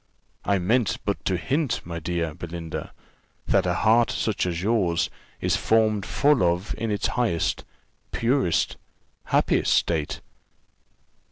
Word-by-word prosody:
I 100 0 +2
meant 95 0 +1
but 100 - -2
to 95 - +1
hint, 135 - -1
my 85 -1 -5
dear 85 -1 -2
Belinda, 85 -1 -6 0.5
that - - +2
a 90 - +1
heart 115 +3 +4
such 105 -4 -1
as 85 0 -3
yours 100 -6 +1 0.3
is - - +1
formed 110 -3 +2
for 145 +2 +3
love 90 -5 +1
in 110 +1 -3
its 105 -2 -1
highest, 115 -10 0 0.5
purest, 115 - +1 0.5
happiest - - +2
state." 80 -3 0
95 Hz, 125 wpm, -25 LUFS, 85-115 Hz, 0.5 s, heart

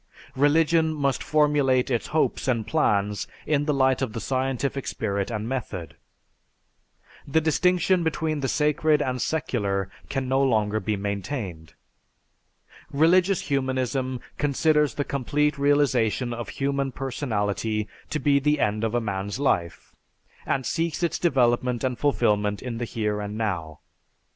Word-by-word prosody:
"Religion 160 +3 +3
must 140 -2 0
formulate 145 -4 +2
its 120 - 0
hopes 155 -3 0
and 115 -4 +1
plans 105 - +1 0.2
in 145 -1 +1
the 150 - +1
light 130 -2 +2
of 125 -5 -2
the 115 - -3
scientific 135 +3 -2
spirit 100 -1 -2
and 110 -1 -3
method. 100 - -5 1.3
"The 140 +3 +3
distinction 180 +3 +2
between 160 -1 -1
the 135 - -1
sacred 150 +1 +2
and 125 -1 -2
secular 100 - -1 0.2
can 135 -1 -2
no 135 +1 +2
longer 110 -5 +2
be 105 +1 -1
maintained. 100 - -5 1.2
"Religious 180 +5 +3
humanism 130 -1 -1 0.2
considers 150 +1 +2
the 145 - 0
complete 145 +2 0
realization 130 -4 +2
of 120 -3 -5
human 140 -1 -1
personality 110 -5 -2 0.2
to - - -1
be 145 -2 +3
the 150 +2 +1
end 105 +1 0
of 115 +1 0
a - - +3
man's 100 +1 -3
life, 85 - -1 0.5
and 130 -2 0
seeks 165 +4 -1
its 170 - 0
development 125 -5 +2
and 125 -2 -1
fulfilment 105 -7 +1
in 120 -2 -4
the 120 - -2
here 105 -2 -2
and 105 +1 -5
now. 85 -8 -3
130 Hz, 140 wpm, -25 LUFS, 110-145 Hz, 1.3 s, Religion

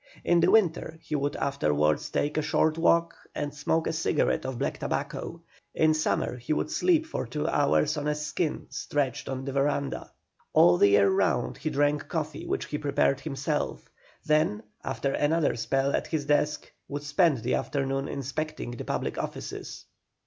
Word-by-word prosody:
In 175 - +4
the 170 - +4
winter 175 -6 +2
he 155 - -8
would 145 0 -1
afterwards 75 - +1
take 145 +1 -1
a 155 - +2
short 155 +1 +2
walk 170 0 +3 0.2
and 145 -1 -3
smoke 160 +3 0
a - - -1
cigarette 160 -4 +1
of 130 -2 -4
black - - -2
tobacco; - - -3 0.3
in 155 0 +4
summer 155 -4 0
he 125 +5 -2
would - - -1
sleep 335 -3 +3
for 320 - -4
two 150 -1 -2
hours 150 +1 +2
on 145 0 -2
a 150 - +1
skin 150 +2 -2
stretched 140 -4 -2
in 130 0 -4
the 135 - -3
verandah. 140 +1 -1 0.4
All 90 0 +6
the - - +7
year 100 0 +5
round 95 - +1
he 155 - -2
drank 145 0 +1
coffee 155 0 -4
which - - -1
he 150 - -4
prepared 140 -2 +1
himself; 145 0 -3 0.4
then, 165 +8 +2 0.2
after 140 - -2
another 155 +1 +2
spell 135 +3 0
at - - -2
his 155 -3 -2
desk, 150 +1 +1 0.2
would 145 0 -5
spend 150 - +2
the 125 - 0
afternoon 135 -1 -1
inspecting 140 -1 -4
the 120 - -6
public - - -2
offices. - - -6
145 Hz, 170 wpm, -27 LUFS, 135-155 Hz, 0.4 s, the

